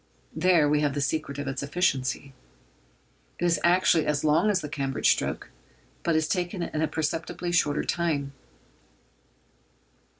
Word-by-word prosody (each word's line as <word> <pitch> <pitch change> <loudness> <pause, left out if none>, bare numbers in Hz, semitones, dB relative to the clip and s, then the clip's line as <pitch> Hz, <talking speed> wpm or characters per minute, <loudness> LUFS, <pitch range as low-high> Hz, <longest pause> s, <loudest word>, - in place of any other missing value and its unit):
There 165 -2 +4
we 150 0 +2
have 145 -1 0
the - - -1
secret 140 0 -2
of 145 -1 -4
its 135 0 -3
efficiency. 140 -3 -1 1.0
It 175 - -1
is 170 -1 +2
actually 175 -2 +3
as 150 -1 0
long 155 +7 +3
as 195 -3 +1
the 150 - -5
Cambridge 140 -2 +1
stroke, - - -2 0.5
but 170 - 0
is 155 0 +1
taken 180 0 -2
in 155 - -3
a 160 - +2
perceptibly 165 +3 -3
shorter 150 -4 +1
time. 155 -4 -1
155 Hz, 145 wpm, -26 LUFS, 145-175 Hz, 1.0 s, There